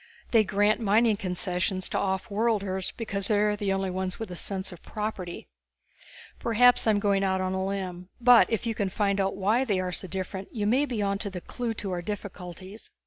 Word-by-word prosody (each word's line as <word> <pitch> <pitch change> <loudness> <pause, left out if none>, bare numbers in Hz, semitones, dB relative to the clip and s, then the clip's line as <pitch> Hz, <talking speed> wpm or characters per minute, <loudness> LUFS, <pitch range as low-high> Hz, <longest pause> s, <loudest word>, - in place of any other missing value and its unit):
They 225 -2 +6
grant 205 +2 +2
mining 220 +1 +3
concessions 180 0 -1
to - - -1
offworlders 200 0 0
because 200 -4 -1
they 210 - +2
are 210 0 +2
the 205 -2 -1
only 195 -1 0
ones 185 0 -3
with 225 -4 -6
a - - -5
sense 190 +2 -4
of 175 - -11
property. 210 -5 -5 1.0
Maybe 245 +2 +6
I'm 210 -2 +4
going 200 -1 +2
out 190 -1 +1
on 185 0 -1
a 190 0 -1
limb. 185 -2 -4
But 245 -1 +7
if 225 +1 0
you 230 - 0
can 200 -3 -1
find 200 0 +1
out 195 0 0
why 210 +6 +2
they 205 -7 0
are 185 -1 -2
so 185 - -5
different 190 +1 -5
you 210 -3 -2
may 260 +7 +3
be 225 -6 -2
onto 200 +1 -1
the 185 -2 -6
clue 230 +5 -4
to 200 -2 -4
our 175 -1 -2
difficulties." 185 0 -7
200 Hz, 200 wpm, -27 LUFS, 185-215 Hz, 1.0 s, But